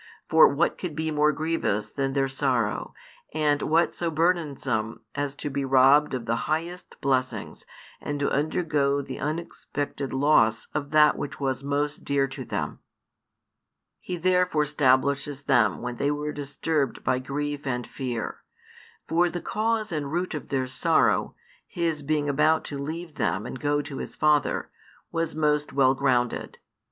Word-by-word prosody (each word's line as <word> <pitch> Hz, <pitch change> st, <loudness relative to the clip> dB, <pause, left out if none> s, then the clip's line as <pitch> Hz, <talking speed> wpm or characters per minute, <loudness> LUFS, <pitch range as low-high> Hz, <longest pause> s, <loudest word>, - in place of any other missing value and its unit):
For 160 Hz, 0 st, +7 dB
what 160 Hz, +5 st, 0 dB
could 175 Hz, -5 st, -4 dB
be 160 Hz, +1 st, -2 dB
more 150 Hz, 0 st, +3 dB
grievous 155 Hz, -9 st, -1 dB
than 135 Hz, -1 st, -1 dB
their 135 Hz, -1 st, +2 dB
sorrow, 130 Hz, -5 st, -1 dB, 0.4 s
and 150 Hz, -2 st, +2 dB
what 165 Hz, +2 st, +2 dB
so 170 Hz, -, -2 dB
burdensome 145 Hz, -10 st, 0 dB
as 145 Hz, -1 st, -3 dB
to 145 Hz, -, -5 dB
be 140 Hz, +1 st, -1 dB
robbed 135 Hz, +2 st, +5 dB
of 120 Hz, -3 st, -5 dB
the 115 Hz, 0 st, 0 dB
highest 170 Hz, +4 st, -3 dB
blessings 130 Hz, -2 st, -1 dB, 0.3 s
and 145 Hz, 0 st, -3 dB
to 140 Hz, -, 0 dB
undergo 145 Hz, -2 st, +1 dB
the -, -, -7 dB
unexpected 145 Hz, -3 st, -4 dB
loss 130 Hz, -5 st, +3 dB
of 145 Hz, -1 st, -2 dB
that 150 Hz, 0 st, +5 dB
which 145 Hz, -, -5 dB
was 135 Hz, -2 st, -1 dB
most 145 Hz, +1 st, -1 dB
dear 140 Hz, -1 st, +1 dB
to 135 Hz, -, -6 dB
them? -, -, -4 dB, 1.2 s
He 180 Hz, -, -5 dB
therefore 180 Hz, -3 st, +2 dB
stablishes 140 Hz, 0 st, +1 dB
them 120 Hz, -4 st, +3 dB
when 125 Hz, -1 st, -4 dB
they 140 Hz, -, +1 dB
were 150 Hz, +1 st, -2 dB
disturbed 145 Hz, -1 st, -2 dB
by 130 Hz, -, +1 dB
grief 145 Hz, +2 st, -4 dB
and 125 Hz, -2 st, -1 dB
fear. 125 Hz, -4 st, -4 dB, 0.7 s
For 175 Hz, +2 st, +3 dB
the 175 Hz, -, -4 dB
cause 220 Hz, +1 st, -1 dB
and 145 Hz, -3 st, -3 dB
root 175 Hz, +2 st, -1 dB
of 150 Hz, -, -6 dB
their 130 Hz, -2 st, 0 dB
sorrow, 130 Hz, +1 st, +2 dB, 0.3 s
His 165 Hz, -3 st, -1 dB
being 150 Hz, 0 st, 0 dB
about 155 Hz, +3 st, +3 dB
to 140 Hz, -, -6 dB
leave 160 Hz, +2 st, -6 dB
them 105 Hz, -1 st, 0 dB
and 125 Hz, -, -6 dB
go 145 Hz, +2 st, +1 dB
to 145 Hz, -2 st, -7 dB
His -, -, -6 dB
Father, 150 Hz, -2 st, +2 dB, 0.4 s
was 165 Hz, -2 st, -2 dB
most 150 Hz, -1 st, +1 dB
well 135 Hz, -1 st, +4 dB
grounded. 125 Hz, -3 st, 0 dB
145 Hz, 155 wpm, -26 LUFS, 135-155 Hz, 1.2 s, For